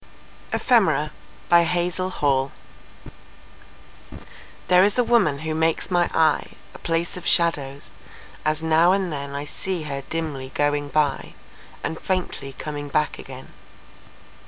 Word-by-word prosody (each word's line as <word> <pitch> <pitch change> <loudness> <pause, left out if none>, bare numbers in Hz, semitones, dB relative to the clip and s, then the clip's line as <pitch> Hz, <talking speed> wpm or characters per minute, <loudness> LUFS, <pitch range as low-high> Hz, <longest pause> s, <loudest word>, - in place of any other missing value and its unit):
Alexander - - +3 0.4
Gray 170 0 +8
Ephemera 170 -5 0 2.2
THERE 180 0 +6
is 205 +3 +2
a 245 - +4
woman 220 -12 +3
who 160 - -1
makes 160 +4 0
my 175 -1 +3
eye 155 -2 +2 0.2
A - - -11
place 165 +1 -1
of 180 - -6
shadows, 140 -9 0 0.5
as 155 +1 0
now 160 +3 +4
and 190 -4 0
then 140 -1 -5
I 145 +1 -3
see 180 +2 -3
her 140 -2 -4
dimly 150 -5 -3
going 145 0 +1
by, 145 -2 0 0.5
And 160 - -3
faintly 180 -7 -3
coming 145 0 -6
back 150 +1 0
again. - - -10
160 Hz, 125 wpm, -23 LUFS, 145-175 Hz, 2.2 s, Gray